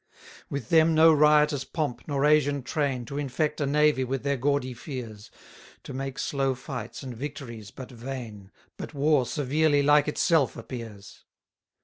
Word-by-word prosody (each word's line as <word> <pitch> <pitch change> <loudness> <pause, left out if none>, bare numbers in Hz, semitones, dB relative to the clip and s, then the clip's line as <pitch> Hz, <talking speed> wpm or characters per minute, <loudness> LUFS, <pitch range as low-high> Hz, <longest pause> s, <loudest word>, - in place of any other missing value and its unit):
52 - - -19
With 140 -5 -5
them 160 0 +4
no 160 +1 +7
riotous 150 -1 +4
pomp, 145 -4 -3
nor 140 -1 0
Asian 145 -2 +3
train, 135 -3 -2
To 140 +2 -5
infect 150 +2 -2
a 140 - +1
navy 150 -1 +3
with 130 +1 -3
their 140 0 0
gaudy 135 -1 0
fears; 120 -5 -8 0.5
To - - -8
make 135 0 -5
slow 135 -2 -1
fights, 120 0 -7
and 130 -3 -7
victories 115 -5 -7
but 130 +5 -10
vain: 115 -5 -8 0.3
But - - -8
war 140 -3 +2
severely 145 +2 +1
like 145 +1 +4
itself 150 -2 +2
appears. 115 -4 -9
140 Hz, 155 wpm, -26 LUFS, 125-150 Hz, 0.5 s, no